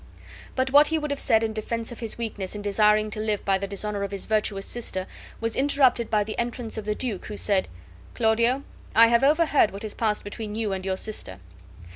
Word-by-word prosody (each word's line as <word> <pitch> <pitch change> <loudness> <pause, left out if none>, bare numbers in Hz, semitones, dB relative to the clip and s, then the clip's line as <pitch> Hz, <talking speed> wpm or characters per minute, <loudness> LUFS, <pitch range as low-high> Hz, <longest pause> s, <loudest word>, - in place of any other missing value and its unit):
But 260 0 0
what 290 +2 +7
he 320 - +1
would 300 -1 -3
have 285 - -2
said 225 -3 +3
in 220 -1 -1
defense 225 +2 -4
of 240 - -9
his 225 -2 -4
weakness 210 -4 -4
in 205 - -6
desiring 210 +1 +3
to 215 - -4
live 215 -1 -1
by 195 -1 +2
the 200 - -3
dishonor 200 +1 -3
of 200 - -2
his 200 -1 -5
virtuous 210 -2 0
sister 190 -6 -3 0.3
was 230 -1 -1
interrupted 265 -4 +3
by 215 -1 +2
the 215 +1 -5
entrance 235 -1 -3
of 220 - -5
the 210 0 -1
duke; 230 -7 -4
who 210 - -6
said: 195 -3 +1 0.5
"Claudio, 235 +4 +2 0.3
I 230 +1 +8
have 235 +2 +3
overheard 295 -4 +4
what 200 +2 -6
has 215 - -4
passed 215 -2 -1
between 210 +1 -6
you 215 -3 -1
and 190 0 -4
your 190 0 0
sister. 200 - -4
220 Hz, 220 wpm, -25 LUFS, 205-235 Hz, 0.5 s, I